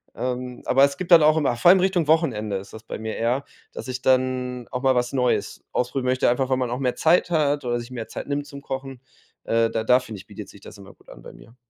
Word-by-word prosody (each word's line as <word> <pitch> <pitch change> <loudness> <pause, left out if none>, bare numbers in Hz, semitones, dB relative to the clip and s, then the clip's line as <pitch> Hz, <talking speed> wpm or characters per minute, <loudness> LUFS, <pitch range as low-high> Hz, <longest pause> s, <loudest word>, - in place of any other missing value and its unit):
Ähm, 125 0 -4
aber 135 +2 +4
es 140 0 +2
gibt 185 -1 -6
dann 165 -3 +8
auch 155 +1 +4
immer 135 -6 +1
vor 125 +9 +4
allem 190 - +7
Richtung 180 -4 +1
Wochenende 110 - +1
ist 95 - -10
das 110 0 -10
bei - - -7
mir 110 0 -5
eher, 125 +5 -1 0.3
dass - - -8
ich 130 0 -5
dann 130 -1 0
auch 125 +1 -4
mal 130 - +4
was 125 0 0
Neues 125 -2 -1
ausprobieren 125 +1 -2
möchte, 130 +1 +2
einfach 130 +2 0
weil 130 - +2
man 125 -2 -1
auch 125 - -2
mehr 125 -2 -1
Zeit 175 +2 +2
hat 145 -4 +1
oder 120 0 -1
sich 120 0 -9
mehr 120 -3 -6
Zeit - - -7
nimmt 145 0 -2
zum 140 -1 -10
Kochen. 135 -1 -6 0.5
Äh, 115 0 +2
da 110 - -2
da 125 +3 +4
finde 115 -5 -9
ich, 95 - -14
bietet 105 -1 -10
sich 100 - -16
das 105 - -12
immer 100 0 -14
gut - - -24
an - - -13
bei - - -11
mir. 115 - -17
125 Hz, 265 wpm, -23 LUFS, 120-140 Hz, 0.5 s, dann